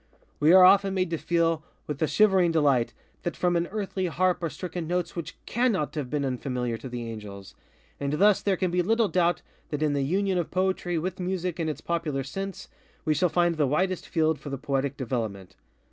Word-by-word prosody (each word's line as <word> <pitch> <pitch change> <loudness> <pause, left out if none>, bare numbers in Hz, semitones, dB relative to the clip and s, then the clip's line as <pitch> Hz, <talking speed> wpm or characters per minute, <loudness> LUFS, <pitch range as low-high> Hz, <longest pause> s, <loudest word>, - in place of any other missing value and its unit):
_We 155 +2 +6
are 185 - +9
often 195 +1 +6
made 185 -2 0
to 165 - -1
feel, 165 -2 +1 0.2
with 150 -2 -5
a 160 - +3
shivering 190 -4 +4
delight, 140 -7 +2 0.3
that 175 - -3
from 175 -1 +1
an 170 0 +1
earthly 195 -2 -3
harp 180 +2 +1
are 165 - -1
stricken 175 -1 -5
notes 180 0 -2
which 170 -2 -5
_cannot 230 - +1
_have 145 -5 -4
been 145 0 -1
unfamiliar 125 -2 -2
to 130 - -7
the 120 -1 -5
angels. 105 -3 -8 0.5
And 140 0 -2
thus 200 +5 +4
there 195 -2 +1
can 185 -1 0
be 180 0 +2
little 225 +3 +2
doubt 175 -1 +1 0.3
that 150 0 -2
in 150 -1 +2
the 140 - 0
union 185 +6 +1
of 170 - -2
Poetry 185 -2 0
with 185 +3 -3
Music 180 -1 -2
in 160 -1 0
its 155 - -5
popular 160 -5 -2
sense, 195 +7 -6 0.4
we 155 - +3
shall 175 +4 +2
find 175 0 +2
the 150 -3 +2
widest 185 +6 0
field 160 -1 +1
for 145 - -8
the 135 - -3
Poetic 140 0 -2
development. 110 -8 -4
170 Hz, 205 wpm, -27 LUFS, 140-185 Hz, 0.5 s, are